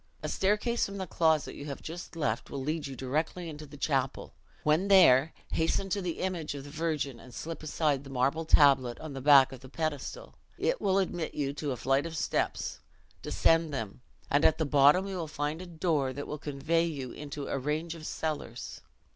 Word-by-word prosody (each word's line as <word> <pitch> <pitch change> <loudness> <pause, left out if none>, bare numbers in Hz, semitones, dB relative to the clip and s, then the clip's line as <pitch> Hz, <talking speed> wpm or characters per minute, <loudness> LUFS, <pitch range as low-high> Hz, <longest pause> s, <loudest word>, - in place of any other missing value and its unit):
A - - -1
staircase 210 +5 +1
from 200 0 -7
the 190 - -3
closet 160 -4 +2
you 145 - -8
have 140 - -5
just 170 +2 -8
left 115 -8 -1
will 140 - -4
lead 155 +1 -2
you 135 - -7
directly 155 +7 -2
into 155 -1 -8
the 145 +1 -12
chapel. 135 -2 -1 0.3
When 155 +6 +3
there 160 -7 +7 0.2
hasten 165 +4 0
to 200 +2 0
the 175 -3 -3
image 175 -6 -2
of 140 - -6
the 145 - -10
Virgin, 150 -5 -2
and 125 - -13
slip 165 +5 -6
aside 150 -2 0
the 140 - -11
marble 135 +5 +1
tablet 140 -6 +4
on 155 -2 -7
the 135 - -6
back 135 -1 +7
of 130 - -9
the 130 +1 -13
pedestal: 155 - -4 0.2
it - - 0
will 190 0 +2
admit 175 -4 -1
you 140 -1 -1
to 145 -1 -3
a 125 - -3
flight 135 +5 +1
of 165 -1 -6
steps; - - -1 0.4
descend 165 -1 +2
them, 115 -4 -5 0.3
and 145 +2 +3
at 160 - +5
the 160 - 0
bottom 145 +6 +5
you 195 -1 -4
will 165 -3 -3
find 150 +2 -3
a 185 - -8
door, 160 -6 0
that 145 +2 -5
will 150 - -5
convey 155 +4 0
you 140 -7 -4
into 145 -1 -6
a 135 - -2
range 155 +5 -2
of 160 -2 -8
cellars. 150 -6 -4
150 Hz, 205 wpm, -30 LUFS, 140-165 Hz, 0.4 s, there